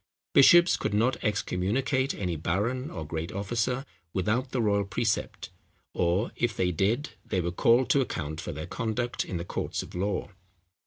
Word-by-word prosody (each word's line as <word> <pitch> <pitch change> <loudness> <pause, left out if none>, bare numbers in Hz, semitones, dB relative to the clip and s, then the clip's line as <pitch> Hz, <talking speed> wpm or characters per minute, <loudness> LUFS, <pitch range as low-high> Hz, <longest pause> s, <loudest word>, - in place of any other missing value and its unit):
Bishops 175 +5 +7
could - - -1
not 120 +5 +1
excommunicate 110 +6 0
any 90 -4 -2
baron 105 - -1
or 80 -3 -6
great 80 +1 -4
officer 120 +6 -1 0.3
without 110 +8 0
the 125 - -2
royal 100 -3 +2
precept; 105 +2 -2 0.4
or 90 +6 +1
if 120 -3 -1
they 90 -1 +2
did, 110 - 0
they 95 - -1
were 85 0 -1
called 120 +7 +3
to 140 - +4
account 80 - -3
for 85 - -5
their 80 0 -5
conduct 115 +5 -2
in 90 - -4
the 85 - -4
courts - - -3
of - - -12
law. 95 +2 -2
105 Hz, 165 wpm, -28 LUFS, 90-125 Hz, 0.4 s, Bishops